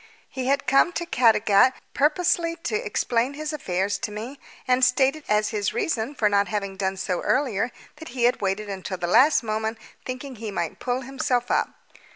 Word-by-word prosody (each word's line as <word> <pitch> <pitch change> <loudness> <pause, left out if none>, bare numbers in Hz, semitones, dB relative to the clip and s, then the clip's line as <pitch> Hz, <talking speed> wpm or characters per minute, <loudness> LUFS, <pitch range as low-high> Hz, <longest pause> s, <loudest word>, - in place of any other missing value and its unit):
He 260 -1 -4
had 275 +1 +1
come 275 +6 +4
to 345 - -3
Caddagat 225 -3 +4 0.2
purposely 335 +3 +1
to - - -1
explain 245 - 0
his 305 +1 -4
affairs 195 -7 -1
to - - -3
me, 230 +7 -7 0.3
and 255 0 +3
stated 270 +4 +3
as 210 0 +2
his 205 -2 -2
reason 250 -2 -1
for 215 - +2
not 200 0 +2
having 200 -2 -3
done 190 0 -2
so 185 -2 -2
earlier 245 -4 0 0.3
that 320 +1 -10
he 245 -1 -3
had 245 +1 +3
waited 200 +2 -1
until 190 -1 -5
the 175 - -3
last 250 - +5
moment 220 0 -2 0.3
thinking 255 0 -6
he 220 0 -5
might 170 -5 -3
pull 250 0 -2
himself 255 -2 -1
up. - - 0
240 Hz, 185 wpm, -24 LUFS, 205-270 Hz, 0.3 s, last